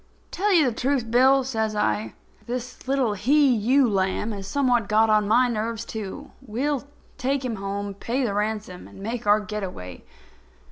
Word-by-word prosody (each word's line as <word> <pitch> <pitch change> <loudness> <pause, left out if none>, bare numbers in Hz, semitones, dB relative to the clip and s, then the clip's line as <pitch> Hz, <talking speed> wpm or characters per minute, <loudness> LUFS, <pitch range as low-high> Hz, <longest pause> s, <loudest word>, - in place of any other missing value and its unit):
"Tell 410 +2 0
you 335 -6 +5
the - - +1
truth, 250 -3 -1
Bill," 265 +2 +5
says 220 -4 -2
I, 110 - -1 0.3
"this 250 +1 -6
little 265 -5 +1
he 270 +6 +3
ewe 250 +5 +3
lamb 195 +1 0
has 195 -2 -6
somewhat 245 -3 +1
got 220 +1 +4
on 210 -1 +3
my 245 +4 +4
nerves 230 0 -3
too. 220 +7 -7
We'll 265 +4 -2 0.3
take 270 0 -1
him 230 -4 -3
home, 200 +1 -4
pay 240 +7 -2
the 220 -5 -1
ransom 210 -3 -3
and - - -15
make 220 +2 -5
our 205 +1 +5
get 210 0 -5
away." 90 - -7
225 Hz, 175 wpm, -24 LUFS, 205-260 Hz, 0.3 s, you